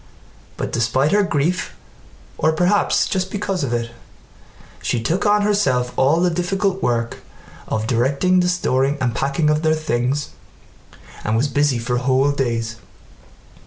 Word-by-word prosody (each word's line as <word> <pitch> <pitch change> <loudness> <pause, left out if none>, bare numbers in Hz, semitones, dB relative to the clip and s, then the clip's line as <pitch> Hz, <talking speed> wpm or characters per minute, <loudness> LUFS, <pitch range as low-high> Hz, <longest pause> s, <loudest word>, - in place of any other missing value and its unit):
But - - -3
despite 120 +5 +1
her 205 - +4
grief, 175 -1 -1 0.6
or 160 - +2
perhaps 180 +5 +2
just 190 -1 -1
because 195 -4 -2
of 130 - -2
it, 115 -1 -2 0.9
she 120 - -1
took 165 - 0
on 205 0 +3
herself 165 -13 +1
all 140 +5 +3
the 180 0 +2
difficult 190 +3 -1
work 115 -1 -1 0.5
of 110 0 -2
directing 140 +10 +2
the 180 0 +2
storing 140 -5 +1
and 125 -3 0
packing 140 +5 0
of 150 0 +1
their 160 -1 +2
things 140 -1 -1 0.9
and 110 +1 0
was 130 +6 +2
busy 145 -1 +1
for 120 +1 -1
whole 130 +3 +2
days. 115 -5 -2
140 Hz, 145 wpm, -20 LUFS, 125-180 Hz, 0.9 s, her